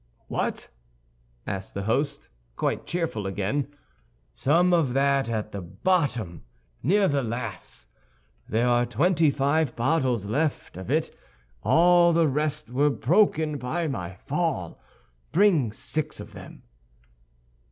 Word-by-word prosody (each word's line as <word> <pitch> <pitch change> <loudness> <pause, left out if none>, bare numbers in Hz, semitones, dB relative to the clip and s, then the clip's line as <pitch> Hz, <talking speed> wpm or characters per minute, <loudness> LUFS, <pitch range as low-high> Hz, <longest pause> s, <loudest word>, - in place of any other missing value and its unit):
"What?" - - -2 0.8
asked 95 -1 -5
the 100 - -3
host, 140 +7 -1 0.3
quite - - -2
cheerful 160 - -2
again. 105 +8 -1 0.7
"Some 175 +6 +3
of 155 -8 +2
that 140 -1 +2
at 110 -2 -3
the 100 - -5
bottom, 110 - -1 0.4
near 195 - +3
the 140 -4 +1
laths. 115 -2 -6 0.6
There 115 +3 +1
are 120 0 +3
twenty 160 - +3
five 145 0 +1
bottles 125 -4 +1
of 100 - -5
it - - -1
left; 140 - -1 0.5
all 175 - +5
the 165 -1 +4
rest 150 -1 -2
were 145 +4 +3
broken 155 - +2
by 145 +8 -2
my 95 - -4
fall. 145 - -3 0.5
Bring 170 - +3
six 155 +7 -4
of - - -10
them." - - -12
140 Hz, 120 wpm, -26 LUFS, 115-160 Hz, 0.8 s, all